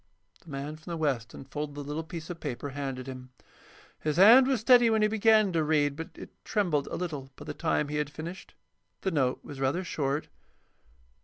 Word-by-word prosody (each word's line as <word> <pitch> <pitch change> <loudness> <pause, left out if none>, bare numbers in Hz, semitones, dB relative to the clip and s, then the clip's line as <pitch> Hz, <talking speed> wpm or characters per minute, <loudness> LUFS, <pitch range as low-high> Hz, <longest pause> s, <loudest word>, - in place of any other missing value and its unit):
The 170 - -15
man 145 +2 -5
from 160 +3 -13
the 170 - -3
West 135 -7 -1
unfolded 145 +2 -6
the 145 - -5
little 150 +3 -3
piece 165 +1 -7
of 170 - -7
paper 145 -1 -4
handed 135 -2 -4
him. 130 -1 -8 0.7
His 155 0 -1
hand 235 +8 +8
was 265 -3 +2
steady 240 0 +6
when 220 -1 +3
he - - +5
began 215 -1 +4
to 160 -2 +2
read, 150 -2 +2
but 165 +2 -6
it - - -10
trembled 170 -9 0
a - - -4
little 150 -7 -4
by 145 - -11
the 150 - -5
time 155 -2 0
he 150 +1 -3
had 150 -1 -1
finished. 165 +5 -8 0.5
The 190 - -1
note 130 -6 +1
was 140 - -8
rather 135 +7 0
short. 145 -3 -2
150 Hz, 205 wpm, -29 LUFS, 140-180 Hz, 0.7 s, hand